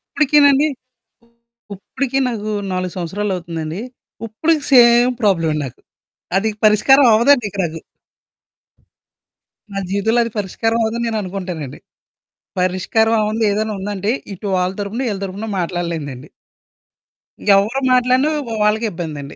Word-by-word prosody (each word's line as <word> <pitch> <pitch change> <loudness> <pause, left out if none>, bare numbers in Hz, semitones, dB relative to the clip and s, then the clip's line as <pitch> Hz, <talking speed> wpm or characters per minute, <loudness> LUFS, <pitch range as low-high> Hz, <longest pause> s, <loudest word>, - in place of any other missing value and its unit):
ఇప్పుడికీనండి. 290 0 +4 1.1
ఇప్పుడికీ 270 +7 -3
నాకు 215 -2 -4 0.2
4 185 -1 -3
సంవత్సరాలవుతుందండి, 175 -2 -4 0.5
ఉప్పడికి 305 +7 0
సేమ్ 240 0 +6
ప్రాబ్లమండి 165 -7 +1
నాకు. 125 - -10 0.6
అదిక 215 +1 -1
పరిష్కారమవ్వదండిక 235 0 +4
నాకు. 165 -1 -4 1.9
నా 195 - -2
జీవితంలో 220 +4 +1
అది 230 - -5
పరిష్కారమవ్వదని 225 +3 -1
నేననుకుంటానండి. 185 - -5 0.8
పరిష్కారం 185 +5 +1
అవ్వంది 215 +1 -1
ఏదైనా 215 +1 -1
ఉందంటే, 200 +1 -3 0.2
ఇటు 200 +3 -6
వాళ్ళ 180 +1 0
తరుపున, 210 +6 -3
ఈళ్ళ 200 -1 -4
తరపున 195 +4 -6
మాట్లాడలేనిదండి. 165 -6 -4 1.3
ఎవ్వరు 215 +7 +1
మాట్లాడినా 255 +3 +3 0.2
వ్ - - -6
వాళ్ళకే 215 +2 +1
ఇబ్బందండి. 155 -5 -7
210 Hz, 100 wpm, -18 LUFS, 180-235 Hz, 1.9 s, సేమ్